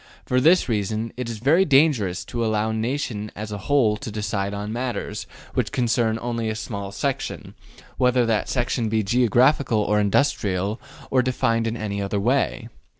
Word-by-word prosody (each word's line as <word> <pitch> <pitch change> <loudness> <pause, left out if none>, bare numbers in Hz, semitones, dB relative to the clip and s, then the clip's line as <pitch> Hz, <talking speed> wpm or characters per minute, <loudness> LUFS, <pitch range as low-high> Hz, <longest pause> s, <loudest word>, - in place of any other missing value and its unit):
For 125 0 +1
this 170 +6 +5
reason, 110 0 -2
it 125 -2 -4
is 115 - -5
very 145 - +4
dangerous 135 - +2
to 120 -2 -3
allow 110 -1 0
the - - -2
nation 110 -2 -2
as 105 +1 -6
a 105 - -4
whole 115 -1 +2
to 110 - -7
decide 100 -2 -2
on 105 +1 -4
matters 120 -3 -4 0.3
which - - -1
concern 120 -2 +1
only 115 -2 -2
a 110 - -2
small 100 -2 -5
section, 135 +7 -3 0.5
whether 125 -1 +3
that 110 -2 0
section 120 -2 0
be 110 0 +1
geographical 120 +1 +3
or 105 0 +2
industrial 100 -2 +1 0.3
or 130 - +4
defined 115 -2 0
in 115 +1 -2
any 100 -2 -3
other 100 +1 -1
way. 125 +1 0
115 Hz, 170 wpm, -23 LUFS, 105-125 Hz, 0.5 s, this